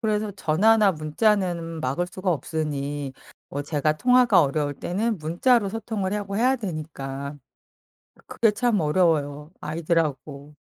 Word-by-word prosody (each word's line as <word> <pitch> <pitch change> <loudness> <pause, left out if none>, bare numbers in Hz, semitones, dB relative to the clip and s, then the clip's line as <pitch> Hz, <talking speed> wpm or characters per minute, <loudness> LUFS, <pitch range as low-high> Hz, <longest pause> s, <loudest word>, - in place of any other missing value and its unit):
그래서 215 -2 0
전화나 200 +5 +3
문자는 165 0 0
막을 140 +7 -1
수가 185 0 -2
없으니 145 -2 -3 0.4
어 145 +1 -4
제가 150 0 0
통화가 250 +1 +5
어려울 145 0 -1
때는 210 +7 -2
문자로 195 +8 +2
소통을 210 -2 -3
해 - - 0
하고 200 -1 -4
해야 255 +4 +3
되니까 145 - -6 0.9
그게 225 -2 +2
참 225 -3 +1
어려워요. 150 -2 +1
아이들하고. 150 -3 -2
165 Hz, 300 characters per minute, -24 LUFS, 150-210 Hz, 0.9 s, 통화가